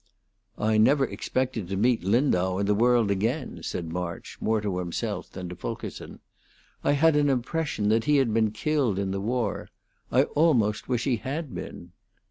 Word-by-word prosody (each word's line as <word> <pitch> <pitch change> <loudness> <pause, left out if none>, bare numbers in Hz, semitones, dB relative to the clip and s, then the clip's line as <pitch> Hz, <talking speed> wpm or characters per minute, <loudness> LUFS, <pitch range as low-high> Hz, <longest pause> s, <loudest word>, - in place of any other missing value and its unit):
"I 110 0 +2
never 135 +5 +4
expected 115 -1 -2
to 95 +1 -3
meat 120 +1 +2
Lindau 95 -4 +2
in 100 - 0
the 105 - +3
world 115 -1 +3
again," 115 - -1
said 80 0 -4
March, 90 -1 -5
more 110 0 +1
to 100 -3 -2
himself 90 +3 -3
than 90 -1 -6
to 90 - -7
Fulkerson. - - -7 0.6
"I - - +3
had 155 +2 +4
an 145 -1 +3
impression 135 -3 -1
that 115 +1 +2
he 150 -1 +4
had 130 -5 +2
been 110 -1 +3
killed 125 -1 0
in 100 -1 -1
the 95 0 -2
war. 115 -1 -2 0.4
I - - +5
almost 125 -11 +1
wish 120 -2 0
he 125 -4 +1
had 140 +4 -5
been." 85 - -8
110 Hz, 175 wpm, -26 LUFS, 100-130 Hz, 0.6 s, I